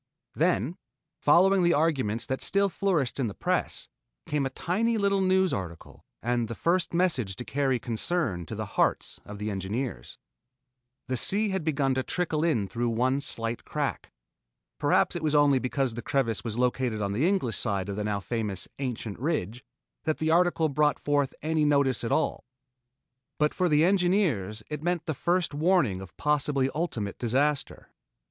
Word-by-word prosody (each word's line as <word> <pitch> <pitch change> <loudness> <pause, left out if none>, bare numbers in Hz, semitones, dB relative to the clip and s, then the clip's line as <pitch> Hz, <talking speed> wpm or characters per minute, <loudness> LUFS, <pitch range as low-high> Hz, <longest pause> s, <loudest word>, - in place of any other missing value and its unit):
Then 130 - +1 0.4
following 185 +5 +5
the 175 -1 +4
arguments 135 -8 0
that 130 - -3
still 200 0 +2
flourished 170 -10 0
in 130 - +1
the 100 - -6
press, - - -1 0.4
came 145 -2 0
a - - -5
tiny 220 - 0
little 200 -1 +2
news 190 0 +3
article 85 -4 -7 0.2
and 120 0 0
the 115 - -5
first 175 +5 +1
message 160 - 0
to 125 - -7
carry 135 -2 +1
concern 115 - -2
to - - -5
the - - -3
hearts - - 0
of 105 - -8
the 105 +1 -3
engineers. 100 - -4 0.9
The 130 - -2
sea 205 - +2
had 190 -3 -2
begun 140 -4 +1
to 130 - 0
trickle 160 +1 -1
in 120 -12 +1
through 120 +3 -1
one 130 +4 +1
slight 115 -3 -1
crack. - - -3 0.7
Perhaps - - +2
it - - -3
was 155 -1 0
only 145 -2 +5
because 130 0 -1
the 120 - -5
crevice 115 -6 -1
was 115 -1 -4
located 125 -2 0
on 100 -1 -1
the 125 - +1
English 180 - +1
side 100 -2 -1
of 100 - -4
the 105 - -2
now 105 -1 -1
famous 105 -3 -3
"ancient 120 -6 -4
ridge" 125 - -2 0.4
that 155 - 0
the 160 0 0
article 170 -1 +3
brought 150 0 +2
forth 145 -2 0
any 155 0 +1
notice 140 -5 +2
at 115 - -2
all. 160 - 0 0.9
But 150 0 +2
for 180 -1 +1
the 150 +1 +4
engineers 175 - +1
it 150 -1 -5
meant 175 -1 -1
the 160 - -1
first 175 +2 0
warning 150 - +2
of 95 -3 -12
possibly 140 -2 +1
ultimate 120 - -3
disaster. 135 +4 0
140 Hz, 170 wpm, -27 LUFS, 115-165 Hz, 0.9 s, following